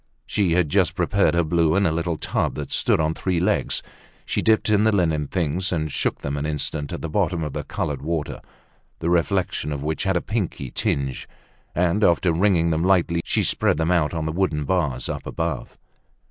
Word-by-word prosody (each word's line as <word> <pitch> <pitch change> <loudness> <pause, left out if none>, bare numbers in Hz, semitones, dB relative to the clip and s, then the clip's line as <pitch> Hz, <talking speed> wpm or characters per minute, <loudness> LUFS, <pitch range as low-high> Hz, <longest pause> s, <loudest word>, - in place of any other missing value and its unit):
She 95 -5 +1
had 85 -3 +2
just 95 +1 +2
prepared 95 0 +2
her 85 - +3
blue 80 0 +2
in 100 0 +3
a 85 - +2
little 85 0 -1
tub - - -1
that 75 -2 -5
stood - - +2
on 80 0 +1
three 90 +1 -1
legs. 90 - +1 0.4
She - - -1
dipped 110 -1 +3
in 105 -1 +4
the 110 0 +4
linen 80 -7 +1
things, 90 +2 -1
and 80 -4 -1
shook - - -1
them 70 0 -3
an 70 - -2
instant 75 0 -2
at - - -5
the - - -1
bottom 85 -1 0
of 75 - -4
the - - -3
colored 70 -3 -3
water, 80 0 -3 0.6
the 85 - -1
reflection 90 -2 0
of 70 -1 -4
which 80 +4 -2
had 95 -2 +2
a - - +2
pinky 95 - -3
tinge; 70 -2 -2 0.5
and 90 +5 +2
after 85 -1 +3
wringing 85 -2 +2
them 80 +1 0
lightly, 90 -2 +2
she - - 0
spread - - +2
them 80 +2 +1
out 85 -4 +2
on 80 -2 -3
the 80 - -1
wooden 80 -4 0
bars 80 -6 0
up - - -5
above. - - -3
85 Hz, 205 wpm, -23 LUFS, 75-95 Hz, 0.6 s, in